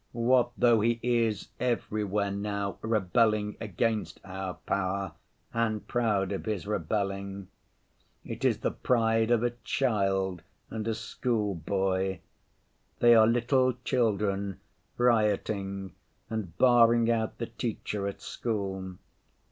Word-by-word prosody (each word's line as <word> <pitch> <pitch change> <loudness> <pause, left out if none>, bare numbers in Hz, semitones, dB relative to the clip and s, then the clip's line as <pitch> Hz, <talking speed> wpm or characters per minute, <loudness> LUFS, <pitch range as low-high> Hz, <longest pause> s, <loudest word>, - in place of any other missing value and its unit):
What 120 +1 +3
though 120 -3 +4
he 115 +1 +1
is 115 -3 +1
everywhere 105 -4 -1
now 100 0 -3
rebelling 105 0 +1
against 110 +1 -1
our 95 -1 -5
power, 95 -1 -2 0.4
and 110 -2 -1
proud 105 -6 +1
of 100 - -4
his 105 -4 -2
rebellion? 100 0 -2 0.8
It - - -6
is - - +2
the - - 0
pride 115 -2 +2
of 120 -1 +3
a 120 - +2
child 95 -7 0 0.3
and 110 -1 -4
a 110 - 0
schoolboy. 95 - -1 0.8
They 120 0 +6
are 110 -1 +7
little 125 +2 +3
children 100 -5 0 0.4
rioting 100 -5 +1 0.4
and 100 -7 -4
barring 120 -2 +5
out 110 -1 -1
the 115 - -3
teacher 105 -4 -3
at 100 - -6
school. 95 -5 -3
105 Hz, 115 wpm, -29 LUFS, 100-115 Hz, 0.8 s, are